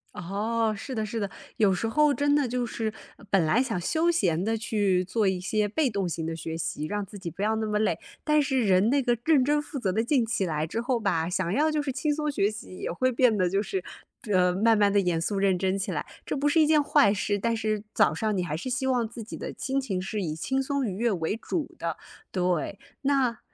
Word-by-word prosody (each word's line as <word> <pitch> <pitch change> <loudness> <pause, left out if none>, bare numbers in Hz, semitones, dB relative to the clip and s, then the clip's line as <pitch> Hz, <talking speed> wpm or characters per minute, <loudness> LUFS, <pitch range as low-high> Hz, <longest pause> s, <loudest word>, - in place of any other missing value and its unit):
哦， 215 +5 -1
是 255 +5 -6
的 220 - -1
是 225 +2 -4
的。 200 -2 -2 0.3
有 205 -3 +4
时 225 +5 -1
候 300 +5 +3
真 285 +1 +2
的 285 -4 +2
就 245 0 -1
是， 225 -1 -3 0.4
本 190 -5 +3
来 225 +11 +3
想 225 -8 -1
休 320 - +1
闲 180 - +1
地 225 +2 0
去 205 -5 +1
做 210 +3 +1
一 190 -1 0
些 210 +3 0
被 280 +7 +1
动 200 -5 -1
型 165 0 -3
的 165 0 -3
学 160 0 -5
习， 155 -2 -3
让 205 -1 -2
自 200 +1 -11
己 180 -2 -5
不 185 +4 -5
要 220 +1 +2
那 220 - -1
么 210 0 0
累。 205 -6 +1 0.2
但 300 0 +3
是 265 -3 +1
人 195 0 +3
那 275 +1 +2
个 240 -1 +2
认 290 -6 +4
真 295 +1 +2
负 295 - -7
责 200 -8 0
的 220 +4 +1
劲 245 -1 +2
起 210 -4 -1
来 155 -2 -1
之 225 +8 -3
后 245 0 0
吧， 170 -6 0
想 180 0 -1
要 300 +7 +3
就 305 - 0
是 275 - -2
轻 290 +3 -1
松 300 0 -1
学 205 -7 +1
习， 210 -3 -9
也 - - -3
会 255 +9 +1
变 235 -3 +3
得 185 -2 +2
就 195 +2 +1
是， 190 -2 -3 0.5
呃， 180 -1 +4
慢 225 +4 +4
慢 205 -1 +3
地 200 - +4
严 175 -3 0
肃 200 +3 -1
认 195 -2 +2
真 190 0 +1
起 195 - -3
来。 - - -2 0.2
这 - - -2
不 290 +1 +1
是 320 - +3
一 310 - +6
件 300 -1 +4
坏 200 -7 +4
事， 205 0 0
但 230 +3 0
是 215 -1 -1
早 - - +4
上 215 +4 -1
你 180 - 0
还 155 -3 -3
是 195 - -6
希 260 +1 -1
望 245 -3 +1
自 230 0 -8
己 225 - -8
的 - - -6
心 270 +1 -1
情 200 -9 -2
是 195 +1 -3
以 155 -2 -3
轻 265 +11 -1
松 280 -1 -1
愉 195 - -3
悦 235 0 +1
为 180 +4 -1
主 305 +6 -4
的， - - -3 0.3
对。 180 +1 -1 0.2
那， 270 -4 +1
215 Hz, 275 characters per minute, -27 LUFS, 190-255 Hz, 0.5 s, 一